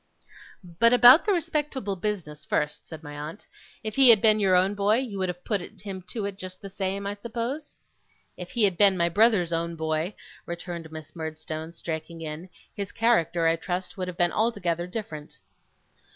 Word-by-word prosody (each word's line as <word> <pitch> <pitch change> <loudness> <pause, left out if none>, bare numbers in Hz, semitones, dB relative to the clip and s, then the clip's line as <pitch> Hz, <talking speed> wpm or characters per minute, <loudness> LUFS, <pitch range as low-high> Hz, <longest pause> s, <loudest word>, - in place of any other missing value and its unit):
'But 180 +7 +2
about 245 +5 +8
the 415 - +2
respectable 295 - -1
business 175 -6 -4
first,' 150 -1 -2
said 160 -1 -9
my 145 -1 -8
aunt. 150 +6 -7 0.4
'If 215 +2 -5
he 270 -2 +9
had 225 -3 +9
been 215 +1 +4
your 190 -3 +3
own 185 +2 +3
boy, 205 +1 +2
you 230 -5 -3
would 185 -1 0
have 180 0 -7
put 205 -4 0
him 195 0 -8
to 220 -4 -3
it, 200 -1 -5
just 185 0 -7
the 195 - -9
same, 195 +1 -2
I 200 - -2
suppose?' 235 +7 -5 0.6
'If 180 0 -8
he 235 - +1
had 190 -4 +3
been 195 -2 +6
my 170 0 +2
brother's 200 -3 +3
own 170 0 -1
boy,' 160 +4 -2 0.3
returned 170 -2 -6
Miss 155 0 -10
Murdstone, 160 0 -6
striking 165 0 -6
in, 160 +3 -6 0.2
'his 200 -2 -5
character, 175 -8 +2
I 165 0 +3
trust, 180 +2 -4
would 185 -2 -4
have 180 -1 -6
been 175 -1 +3
altogether 175 -7 0
different. 180 -7 -7
185 Hz, 185 wpm, -26 LUFS, 165-215 Hz, 0.6 s, he